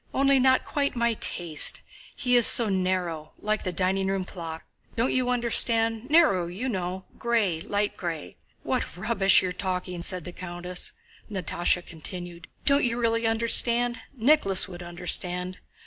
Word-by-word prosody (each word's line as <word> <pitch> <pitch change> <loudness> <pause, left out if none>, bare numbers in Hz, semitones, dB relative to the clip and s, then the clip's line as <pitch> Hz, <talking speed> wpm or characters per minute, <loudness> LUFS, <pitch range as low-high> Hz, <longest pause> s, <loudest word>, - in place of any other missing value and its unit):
Only 275 0 +3
not 260 0 +3
quite 280 -2 -2
my 235 -1 +1
taste—he 175 +7 0
is 240 -2 +6
so 230 -3 +5
narrow, 180 -5 -2
like 215 0 -2
the 185 - -3
dining 190 +2 -1
room 195 -1 -2
clock.... 165 -3 -8 0.3
Don't 235 +3 0
you 255 -1 0
understand? 230 -1 +2
Narrow, 295 - +3
you 195 +9 -5
know—gray, 190 -1 -2
light 205 0 -1
gray..." 165 - -6 0.3
"What - - -3
rubbish 195 -1 +3
you're 185 - -2
talking!" 180 -1 -3
said 180 0 -3
the 180 - -8
countess. 180 0 -5 0.4
Natásha 175 -2 -1
continued: 175 +1 -6 0.2
"Don't 280 0 +3
you 235 -1 -1
really 230 -1 0
understand? 235 +1 +4 0.2
Nicholas 230 -7 +2
would 175 -2 -10
understand.... 180 +1 -2
190 Hz, 140 wpm, -25 LUFS, 180-235 Hz, 0.4 s, is